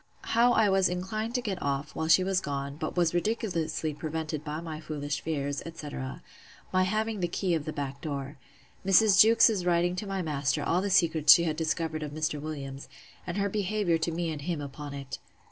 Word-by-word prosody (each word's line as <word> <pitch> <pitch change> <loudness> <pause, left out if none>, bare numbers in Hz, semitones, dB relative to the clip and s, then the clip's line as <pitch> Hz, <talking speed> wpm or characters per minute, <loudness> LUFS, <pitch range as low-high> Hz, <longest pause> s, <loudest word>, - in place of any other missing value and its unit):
How 240 +1 +5
I 220 -2 +4
was 190 -1 +3
inclined 215 +6 -3
to 250 - 0
get 195 -5 -3
off, 140 +1 -2
while 160 - -2
she 185 +3 +6
was 190 0 +1
gone; 140 -2 -4
but 155 +3 -5
was 175 -2 +2
ridiculously 175 -5 -1
prevented 155 0 -4
by 150 0 -4
my 160 -2 -6
foolish 145 -2 -4
fears, 145 -3 -2
etc. 145 -5 -7 0.5
My 185 0 +3
having 215 +2 -1
the 175 - 0
key 180 +1 -1
of 160 -3 -1
the 155 - -3
back 140 -2 -5
door. 140 -2 -5 0.4
Mrs. 195 +1 +5
Jewkes's 225 -3 +5
writing 175 0 +2
to 205 - -4
my 195 -1 -2
master 145 -1 -1
all 175 +5 +1
the 200 - -1
secrets 165 -5 +5
she 170 - +3
had 160 -2 -1
discovered 160 0 -2
of 150 -1 -5
Mr. 155 -1 -2
Williams, 140 -3 -6 0.4
and 175 +2 -3
her 200 0 +1
behaviour 200 -4 0
to 165 +1 -1
me 165 0 -2
and 150 -2 -5
him 165 +1 -2
upon 145 0 -7
it. 135 -1 -7
165 Hz, 200 wpm, -28 LUFS, 150-190 Hz, 0.5 s, she